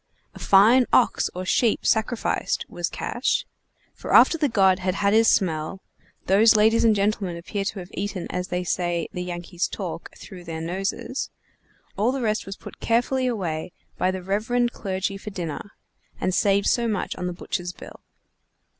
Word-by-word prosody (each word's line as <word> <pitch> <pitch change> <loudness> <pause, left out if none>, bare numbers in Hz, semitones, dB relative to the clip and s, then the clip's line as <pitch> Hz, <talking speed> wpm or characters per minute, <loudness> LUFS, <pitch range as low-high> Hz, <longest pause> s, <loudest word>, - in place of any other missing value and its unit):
A - - -12
fine 225 +6 +5
ox 250 - +3
or 185 +1 -4
sheep 225 +4 +1
sacrificed 220 +1 0
was - - -3
cash; - - -1 0.5
for - - -2
after - - +7
the 300 -3 +1
god 190 -4 +3
had 185 0 -1
had 200 0 +2
his 225 +1 +5
smell 165 -2 +1 0.5
(those 215 +4 +5
ladies 220 +2 +4
and 225 -2 +5
gentlemen 200 -3 0
appear 195 +4 -4
to 200 - -3
have 180 -1 -8
eaten 195 -2 -4
as 180 0 -3
they 180 0 -2
say 175 -1 -1
the 180 - -4
Yankees 175 0 -3
talk 175 -4 -6
through 180 -2 -11
their 165 -2 -6
noses,) 190 +9 -3 0.7
all 215 +5 +2
the 265 -1 -3
rest 215 -2 -1
was 195 - -6
put - - -12
carefully 250 +3 +1
away 180 -8 -3 0.3
by 185 - +2
the 185 -1 -3
reverend 225 +5 0
clergy 195 -1 -3
for 210 - -8
dinner, 175 -1 -6 0.5
and 185 - 0
saved 200 +1 +2
so 235 -1 +2
much 210 -4 -2
on 180 - -4
the - - -2
butcher's 180 0 -4
bill. - - -12
195 Hz, 170 wpm, -24 LUFS, 180-220 Hz, 0.7 s, after